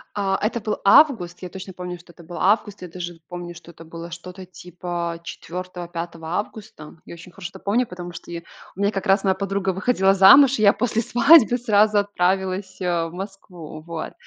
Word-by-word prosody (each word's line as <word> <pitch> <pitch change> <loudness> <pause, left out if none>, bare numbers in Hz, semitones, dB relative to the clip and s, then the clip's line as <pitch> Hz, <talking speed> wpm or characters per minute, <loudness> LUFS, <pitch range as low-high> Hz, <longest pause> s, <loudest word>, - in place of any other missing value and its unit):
А, 195 -2 0
это 230 +3 -1
был 215 - -2
август. 200 - +4
Я 180 - -7
точно 190 0 -9
помню, 180 0 -7
что 175 0 -17
это 170 - -16
был 175 +2 -9
август. 205 0 +1
Я - - -6
даже 175 -1 -7
помню, 175 -1 -7
что 170 - -13
это 165 0 -14
было 165 +1 -9
что-то 180 +3 -9
типа 175 -1 -6
4-го, 180 0 -7
5-го 170 -1 -7
августа. 205 -7 -8
Я - - -10
очень 170 +2 -13
хорошо 180 -2 -8
это - - -13
помню, 230 +4 0
потому 175 -1 -8
что 165 - -11
я 170 - -5 0.3
у - - -14
меня 200 +1 +1
как 195 0 -4
раз 195 +1 +3
моя 190 -1 +3
подруга 195 0 -2
выходила 195 -1 +2
замуж, 225 +7 +7
и - - 0
я 200 -1 +7
после 230 -2 -1
свадьбы 245 +1 +5
сразу 215 -2 +3
отправилась, 190 -1 -1
э, 175 -3 -1
в 165 - -12
Москву, 180 -4 -9
вот. 165 0 -7
185 Hz, 200 wpm, -22 LUFS, 175-205 Hz, 0.3 s, замуж